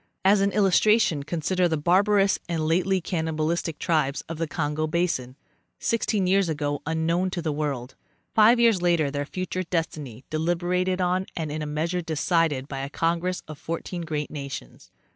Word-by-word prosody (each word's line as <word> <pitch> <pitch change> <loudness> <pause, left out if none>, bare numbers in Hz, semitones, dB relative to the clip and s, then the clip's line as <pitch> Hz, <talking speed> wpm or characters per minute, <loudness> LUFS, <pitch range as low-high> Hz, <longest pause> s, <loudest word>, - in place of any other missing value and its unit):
As 195 +1 +5
an 200 0 +2
illustration 195 -3 +3
consider 170 +4 0
the 160 -2 0
barbarous 195 +5 +3
and 160 -2 -1
lately 185 +3 +2
cannibal 160 -3 -2
istic 165 -2 -2
tribes 150 -5 0
of 165 -1 -6
the 165 - -1
Congo 150 0 -1
basin, 155 -7 -1 0.4
sixteen 215 -4 0
years 190 -1 +3
azo 145 -2 -2
unknown 165 +3 +1
to 185 - -4
the 160 -2 -1
world; 140 -4 -3 0.4
five 225 +3 +6
years 230 -6 +4
later 170 -5 +2
their 145 0 -2
future 185 +1 -3
destiny 155 -8 -3
deliberated 175 +3 0
on 185 +1 +1
and 160 -4 -3
in 155 +1 -3
a 150 - -3
measure 165 +4 -1
decided 160 -3 0
by 135 -2 -5
a 135 +1 -4
congress 170 +4 -1
of 155 -2 -9
fourteen 165 +2 -4
great 150 -3 -3
nations. 140 - -7
165 Hz, 165 wpm, -25 LUFS, 150-185 Hz, 0.4 s, five